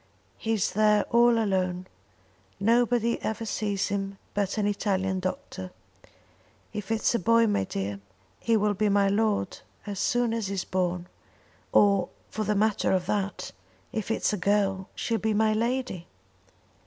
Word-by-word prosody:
He 225 Hz, -, -1 dB
is 210 Hz, -4 st, +1 dB
there 210 Hz, 0 st, +4 dB
all 235 Hz, 0 st, +5 dB
alone. 185 Hz, -4 st, 0 dB, 0.7 s
Nobody 235 Hz, +2 st, +2 dB
ever 220 Hz, +1 st, -3 dB
sees 205 Hz, -2 st, -1 dB
him 195 Hz, -1 st, -3 dB, 0.2 s
but 200 Hz, 0 st, -1 dB
an 210 Hz, -, +1 dB
Italian 190 Hz, -2 st, 0 dB
doctor. 185 Hz, -, -5 dB, 1.0 s
If 210 Hz, -2 st, -5 dB
it's 225 Hz, 0 st, +1 dB
a 235 Hz, -, +1 dB
boy, 230 Hz, +4 st, +4 dB
my 205 Hz, -, +1 dB
dear, 100 Hz, +1 st, -4 dB, 0.4 s
he 230 Hz, -1 st, +2 dB
will 210 Hz, 0 st, +2 dB
be 210 Hz, +1 st, +1 dB
my 200 Hz, 0 st, +3 dB
lord 205 Hz, -2 st, 0 dB, 0.3 s
as 200 Hz, -2 st, -5 dB
soon 240 Hz, 0 st, +1 dB
as 225 Hz, -3 st, -2 dB
he's 195 Hz, -1 st, -2 dB
born; 180 Hz, -1 st, -1 dB, 0.6 s
or 200 Hz, -2 st, +4 dB, 0.2 s
for 220 Hz, -, -2 dB
the 210 Hz, +1 st, +1 dB
matter 210 Hz, +1 st, +2 dB
of 185 Hz, -2 st, +1 dB
that, 200 Hz, -1 st, -2 dB, 0.4 s
if 220 Hz, -2 st, -3 dB
it's 225 Hz, -, +1 dB
a -, -, 0 dB
girl 195 Hz, 0 st, +1 dB
she 230 Hz, -, -2 dB
will 225 Hz, -, 0 dB
be 220 Hz, -1 st, +1 dB
my 215 Hz, 0 st, +3 dB
lady." 235 Hz, -5 st, -2 dB
205 Hz, 155 wpm, -27 LUFS, 190-220 Hz, 1.0 s, all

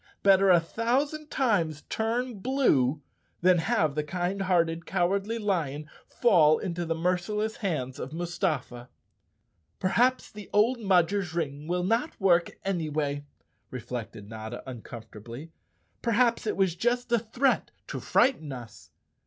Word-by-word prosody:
Better 195 Hz, 0 st, +6 dB
a 175 Hz, -2 st, +7 dB
thousand 270 Hz, -, -1 dB
times 170 Hz, -, 0 dB
turn 230 Hz, 0 st, -2 dB
blue 155 Hz, -, +2 dB, 0.4 s
than 180 Hz, 0 st, +5 dB
have 155 Hz, -2 st, +1 dB
the 150 Hz, +1 st, -1 dB
kind 180 Hz, +4 st, -2 dB
hearted 170 Hz, -3 st, +1 dB
Cowardly 195 Hz, +4 st, 0 dB
Lion 160 Hz, -9 st, -1 dB, 0.2 s
fall 165 Hz, -10 st, +4 dB
into 175 Hz, -3 st, -3 dB
the 165 Hz, -, 0 dB
merciless 180 Hz, +6 st, -1 dB
hands 150 Hz, -, -3 dB
of 135 Hz, -, -5 dB
Mustafa. 160 Hz, -8 st, -3 dB, 0.9 s
"Perhaps 245 Hz, +7 st, +2 dB
the 210 Hz, -1 st, -10 dB
old 230 Hz, +4 st, +3 dB
Mudger's 190 Hz, -3 st, +2 dB
ring 150 Hz, -2 st, -3 dB
will 180 Hz, +1 st, 0 dB
not 230 Hz, -, 0 dB
work 175 Hz, -3 st, +2 dB
any 175 Hz, -5 st, -1 dB
way," 145 Hz, -1 st, -2 dB, 0.4 s
reflected 115 Hz, -4 st, -6 dB
Notta 110 Hz, +2 st, -7 dB
uncomfortably. 120 Hz, +3 st, -9 dB, 0.3 s
" -, -, -43 dB
Perhaps 235 Hz, 0 st, +2 dB
it -, -, -1 dB
was 190 Hz, -3 st, +2 dB
just 240 Hz, +4 st, 0 dB
a 235 Hz, -, +4 dB
threat 240 Hz, +5 st, 0 dB, 0.2 s
to -, -, -5 dB
frighten 240 Hz, -, +2 dB
us." 120 Hz, -5 st, -10 dB
180 Hz, 135 wpm, -28 LUFS, 150-220 Hz, 0.9 s, a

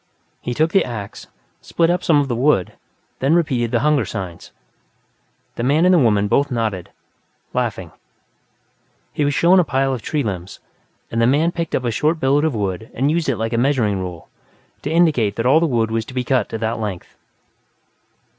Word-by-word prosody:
He 120 Hz, -, -4 dB
took 160 Hz, +4 st, +1 dB
the 195 Hz, -, +4 dB
ax, 110 Hz, -5 st, -7 dB, 0.3 s
split 170 Hz, 0 st, +1 dB
up 180 Hz, -, -1 dB
some 155 Hz, -3 st, +4 dB
of 140 Hz, -, 0 dB
the 120 Hz, -, -2 dB
wood, 125 Hz, -7 st, +1 dB, 0.5 s
then 140 Hz, +5 st, +2 dB
repeated 130 Hz, -9 st, +1 dB
the 120 Hz, 0 st, 0 dB
hunger 150 Hz, -2 st, +2 dB
signs. 95 Hz, -5 st, -7 dB, 1.1 s
The 120 Hz, -, -2 dB
man 150 Hz, +7 st, +3 dB
and 185 Hz, -, +5 dB
the 175 Hz, -, +5 dB
woman 105 Hz, -6 st, +2 dB
both 140 Hz, +7 st, +2 dB
nodded, 110 Hz, -8 st, -2 dB, 0.6 s
laughing; -, -, -2 dB, 1.2 s
he 150 Hz, -, -1 dB
was 145 Hz, -1 st, 0 dB
shown 180 Hz, +2 st, +5 dB
a -, -, +4 dB
pile 135 Hz, -3 st, 0 dB
of 125 Hz, -, -4 dB
tree 150 Hz, +4 st, -2 dB
limbs, 95 Hz, -4 st, -5 dB, 0.5 s
and 115 Hz, -, 0 dB
the 115 Hz, -, +4 dB
man 150 Hz, +6 st, +2 dB
picked 170 Hz, -2 st, -3 dB
up 130 Hz, -, -2 dB
a 120 Hz, -, 0 dB
short 155 Hz, +8 st, 0 dB
billet 140 Hz, +3 st, +2 dB
of 155 Hz, -6 st, 0 dB
wood 100 Hz, +1 st, -3 dB
and 135 Hz, +4 st, +1 dB
used 165 Hz, -2 st, 0 dB
it 125 Hz, -, 0 dB
like 115 Hz, +1 st, -3 dB
a 115 Hz, -, +1 dB
measuring 120 Hz, -7 st, +1 dB
rule, 90 Hz, -3 st, -7 dB, 0.5 s
to -, -, -4 dB
indicate 150 Hz, -11 st, +2 dB
that 115 Hz, -, -2 dB
all 140 Hz, +5 st, +5 dB
the 165 Hz, -, +1 dB
wood 115 Hz, -5 st, 0 dB
was 115 Hz, 0 st, 0 dB
to 130 Hz, -, -11 dB
be 125 Hz, -, 0 dB
cut 125 Hz, -3 st, 0 dB
to -, -, -4 dB
that 110 Hz, +1 st, -2 dB
length. 105 Hz, -5 st, -5 dB
125 Hz, 200 wpm, -20 LUFS, 110-150 Hz, 1.2 s, and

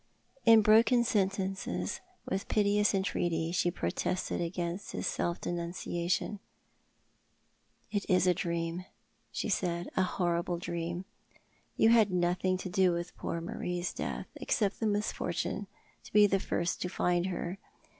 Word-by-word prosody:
In 225 Hz, -1 st, +8 dB
broken 230 Hz, +3 st, +6 dB
sentences, 195 Hz, -3 st, -1 dB, 0.3 s
with 190 Hz, +1 st, -2 dB
piteous 205 Hz, -1 st, +3 dB
entreaty, 170 Hz, -4 st, 0 dB
she 175 Hz, 0 st, +2 dB
protested 175 Hz, -, -2 dB
against 175 Hz, +2 st, -3 dB
his -, -, -3 dB
self 170 Hz, 0 st, -1 dB
denunciation. 175 Hz, +3 st, -2 dB, 1.5 s
"It 205 Hz, -2 st, -1 dB
is 185 Hz, -1 st, +4 dB
a 180 Hz, -, +5 dB
dream," 170 Hz, -1 st, -2 dB, 0.5 s
she -, -, -2 dB
said; 175 Hz, -4 st, -1 dB
"a -, -, +3 dB
horrible 175 Hz, -1 st, 0 dB
dream. 170 Hz, +1 st, -4 dB, 0.7 s
You 220 Hz, -, +5 dB
had 225 Hz, -3 st, +6 dB
nothing 180 Hz, +1 st, +1 dB
to 185 Hz, -, -5 dB
do 185 Hz, 0 st, +3 dB
with 170 Hz, +1 st, -4 dB
poor 165 Hz, -, -3 dB
Marie's 175 Hz, +1 st, -3 dB
death— -, -, -4 dB
except 205 Hz, -3 st, 0 dB
the 225 Hz, -, +1 dB
misfortune 205 Hz, -2 st, -1 dB, 0.4 s
to -, -, -12 dB
be 210 Hz, 0 st, +8 dB
the 195 Hz, -1 st, +2 dB
first 170 Hz, -1 st, -1 dB
to 180 Hz, -, -1 dB
find 180 Hz, 0 st, +1 dB
her. 180 Hz, +1 st, -4 dB
180 Hz, 135 wpm, -31 LUFS, 175-200 Hz, 1.5 s, In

